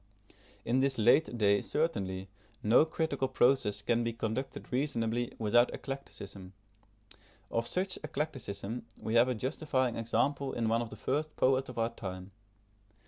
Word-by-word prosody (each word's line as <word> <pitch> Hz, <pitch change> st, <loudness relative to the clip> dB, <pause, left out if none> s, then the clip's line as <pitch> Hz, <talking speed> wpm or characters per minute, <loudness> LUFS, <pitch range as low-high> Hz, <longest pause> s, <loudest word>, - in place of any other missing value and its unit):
In 120 Hz, +3 st, +2 dB
this 135 Hz, 0 st, +1 dB
late 120 Hz, +4 st, +4 dB
day 100 Hz, -2 st, +4 dB
certainly, 95 Hz, -, -1 dB, 0.4 s
no 115 Hz, +8 st, +6 dB
critical 160 Hz, -4 st, -1 dB
process 120 Hz, -6 st, +2 dB
can 120 Hz, +2 st, +2 dB
be 115 Hz, 0 st, -1 dB
conducted 115 Hz, +3 st, -4 dB
reasonably 120 Hz, -3 st, 0 dB
without 120 Hz, +2 st, +4 dB
eclecticism. 100 Hz, -9 st, -8 dB, 1.0 s
Of 115 Hz, 0 st, 0 dB
such 185 Hz, +6 st, -1 dB
eclecticism 125 Hz, -8 st, -4 dB
we 110 Hz, -, -3 dB
have 120 Hz, +1 st, +6 dB
a 125 Hz, -, 0 dB
justifying 130 Hz, 0 st, 0 dB
example 135 Hz, +4 st, 0 dB
in 115 Hz, -2 st, 0 dB
one 115 Hz, +1 st, +2 dB
of 115 Hz, -, -4 dB
the -, -, -8 dB
first 150 Hz, +8 st, -2 dB
poets 130 Hz, 0 st, +2 dB
of 125 Hz, -, -9 dB
our 115 Hz, 0 st, +1 dB
time. 95 Hz, -3 st, -7 dB
120 Hz, 140 wpm, -32 LUFS, 110-135 Hz, 1.0 s, no